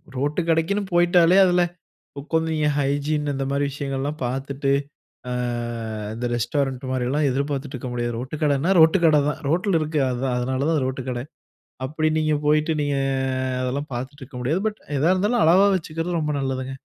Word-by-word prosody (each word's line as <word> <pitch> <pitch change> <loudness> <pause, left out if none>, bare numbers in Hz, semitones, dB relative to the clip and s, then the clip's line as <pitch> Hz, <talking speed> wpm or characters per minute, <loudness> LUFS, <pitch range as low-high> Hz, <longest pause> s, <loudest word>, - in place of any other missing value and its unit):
Road 145 +6 0
கடைக்குன்னு 165 +6 +1
போய்ட்டாலே 175 +1 +5
அதில 180 -1 +3 0.6
உட்காந்து 160 +3 -1 0.2
என் 150 - 0
hygiene 145 +1 0
இந்த 135 0 -2
மாரி 140 +1 +1
விஷயங்கள்லாம் 140 +2 -3
பார்த்துட்டு, 135 +2 -2 0.6
அ - - -3 0.8
இந்த 120 +2 -4
ரெஸ்டாரண்ட் 130 +2 -1
மாரில்லாம் 130 +4 0
எதிர்பார்த்துட்டு 140 +1 -2
இருக்க 130 0 -5
முடியாது. 120 -1 -2
ரோட்டு 130 +5 -5
கடைனா 145 +4 +2
ரோட்டு 160 +4 +6
கடை 155 -2 +5
தான். 150 - -4
ரோட்டுல 180 +1 +2
இருக்கு, 155 -1 0
அதுதான் 125 0 -1
அதனால 130 +3 -1
தான் 155 -3 +1
ரோட்டு 130 0 -3
கடை. 120 -1 -3 0.6
அப்படி 155 +2 0
நீங்க 155 -1 +1
போய்ட்டு 150 +2 +3
நீங்க 145 -1 0 0.7
அதெல்லாம் 140 +4 -3
பார்த்துட்டு 135 +4 -6
இருக்க 130 -1 -10
முடியாது. 155 +10 0
பட், 215 0 -4 0.2
எதா 160 +6 +3
இருந்தாலும் 210 +5 +2
அளவா 185 +5 +6
வச்சுக்கிறது 165 0 -2
ரொம்ப 150 -1 -1
நல்லதுங்க. 135 -1 -3
145 Hz, 160 wpm, -23 LUFS, 135-160 Hz, 0.8 s, ரோட்டு